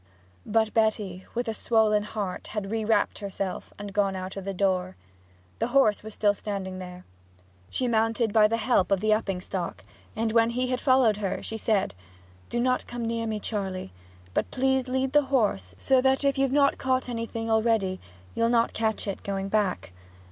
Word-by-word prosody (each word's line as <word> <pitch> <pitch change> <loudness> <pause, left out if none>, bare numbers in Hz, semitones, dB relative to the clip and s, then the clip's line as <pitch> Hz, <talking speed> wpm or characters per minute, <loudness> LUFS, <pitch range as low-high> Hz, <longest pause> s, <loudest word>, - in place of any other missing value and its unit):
But 220 0 +2
Betty 210 -4 0
with 240 +1 -1
a 225 - -1
swollen 220 -1 +2
heart 210 -3 -4
had 210 -2 -4
rewrapped 220 -1 +1
herself 195 -2 -4
and 205 -1 -7
gone 200 -2 +1
out 185 0 -5
of 195 -1 -6
the 195 - -2
door. 185 -1 0 0.6
The - - +1
horse 245 -5 +3
was 215 0 -9
still 205 -1 +3
standing 195 -2 -5
there. 180 0 -9 0.6
She 255 - -1
mounted 225 -1 +1
by 215 -1 +6
the 230 +2 0
help 225 -5 +2
of 195 - +3
the 215 +2 +3
upping 195 -4 -1
stock, 185 -2 -4 0.3
and 220 0 0
when 230 0 +4
he 250 +2 -1
had 255 0 -1
followed 255 -6 +4
her 200 -3 -3
she 225 - -5
said, 215 - 0 0.6
'Do 240 - -1
not 255 +1 +1
come 240 -1 -4
near 230 0 -2
me, 215 -1 -2
Charley; 190 - -4 0.4
but - - 0
please 265 0 +1
lead 260 +1 0
the 295 -1 +5
horse, 205 - 0
so 265 - +3
that 265 +1 +2
if 275 -1 +2
you've 270 -1 +1
not 280 0 +3
caught 260 -1 0
anything 230 -1 -3
already 220 -4 +2 0.3
you'll 230 0 +1
not 235 -1 +2
catch 220 -1 -1
it 200 - -3
going 195 -1 -3
back. 200 - 0
220 Hz, 185 wpm, -27 LUFS, 195-240 Hz, 0.6 s, by